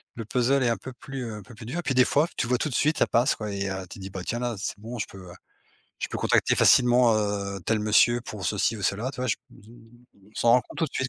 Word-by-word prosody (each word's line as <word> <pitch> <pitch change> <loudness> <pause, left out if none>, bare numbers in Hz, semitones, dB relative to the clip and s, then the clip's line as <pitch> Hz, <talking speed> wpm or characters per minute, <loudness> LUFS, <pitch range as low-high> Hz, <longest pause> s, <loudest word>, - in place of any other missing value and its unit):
le 115 - -5
puzzle 130 +4 +1
est 120 - +2
un 115 - 0
peu 130 - -9
plus, 135 0 -7
heu, 115 - -5
un 105 - -8
peu 120 - -14
plus 110 0 -11
dur, 155 +9 -4
et - - -1
puis 135 - -1
des 130 - +6
fois, 150 +3 +2
tu - - 0
vois 125 +1 +2
tout 155 - -2
de 125 - -4
suite, 155 +2 +2
ça - - +5
passe, 120 +3 +2
quoi 105 -2 -5
et 100 0 -2
heu, 95 -1 -4
tu - - -10
dis: 95 0 -7
«Bah, 95 -1 -6
tiens, 120 - -2
là, 120 -2 -2
c'est 100 - -4
bon, 115 +2 -7
je - - -1
peux, 95 - -13
heu, - - -11 0.7
je - - -2
peux - - -4
contacter - - +2
facilement, 120 -2 +5
heu, 100 -2 -2
tel 110 -1 +1
monsieur 110 +3 +4
pour 105 -5 -7
ceci 105 +2 0
ou 100 - -8
cela», 110 +8 -1
tu - - -11
vois? 130 - -1
Je - - +2 0.2
on 115 -2 -19
on - - -28
s'en 115 - +3
rend 125 - +6
compte - - -13
tout 165 - +2
de - - -11
suite. 130 - -1
115 Hz, 310 wpm, -26 LUFS, 105-125 Hz, 0.7 s, des